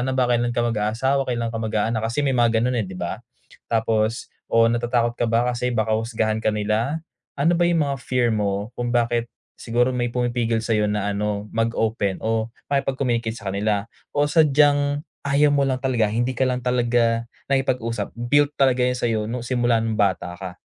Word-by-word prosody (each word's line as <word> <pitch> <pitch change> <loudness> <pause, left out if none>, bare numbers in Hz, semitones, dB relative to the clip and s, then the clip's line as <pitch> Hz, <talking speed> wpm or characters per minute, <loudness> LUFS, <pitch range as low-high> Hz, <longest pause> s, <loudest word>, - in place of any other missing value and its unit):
na 130 +1 -1
ba? 130 - +3
Kailan 120 0 +1
ka 120 - +2
mag-aasawa? 120 +5 0
Kailan 115 -2 -2
ka 115 - -3
mag-aanak?" 110 0 0
Kasi 115 +6 -1
may 135 - +1
mga 120 -2 +3
gano'n, 125 -1 +1
eh, 105 - -1
'di 95 - -8
ba? 90 +5 -4 0.5
Tapos, 110 0 0 0.2
o 115 0 +4
natatakot 120 0 +1
ka 120 - +1
ba 115 +1 +2
kasi 125 +1 -1
baka 110 0 +1
husgahan 110 -1 0
ka 110 - 0
nila? 110 +9 -1 0.3
Ano 145 +5 +3
ba 175 0 +2
'yung 165 -3 +2
mga 140 -1 -2
fear 125 -2 +1
mo 105 +1 -1
kung 120 0 -3
bakit 120 -1 +1 0.3
siguro 120 +2 +1
may 120 -1 -1
pumipigil 120 -2 -1
sa'yo 105 -2 +1
na 105 -1 -1
ano, 105 0 -3
mag 115 +1 0
open 105 -4 0
o 110 0 0 0.2
makipag-communicate 130 -5 0
sa 100 -4 -5
kanila? 100 0 0 0.3
O 145 - +4
sadyang 145 -1 +3 0.2
ayaw 145 +1 +4
mo 145 - +2
lang 130 - +1
talaga, 120 -5 +1
hindi 120 +4 0
ka 130 +1 0
lang 125 -1 -2
talaga 120 -2 +1 0.3
nakikipag-usap, 120 -5 -1
built 145 +5 +2
talaga 130 -2 +3
'yan 125 0 0
sa'yo 115 -3 0
no'ng 120 +1 -4
simula 120 -1 +1
no'ng 110 -1 -2
bata 95 -3 0
ka? 90 -1 -7
120 Hz, 190 wpm, -23 LUFS, 110-130 Hz, 0.5 s, o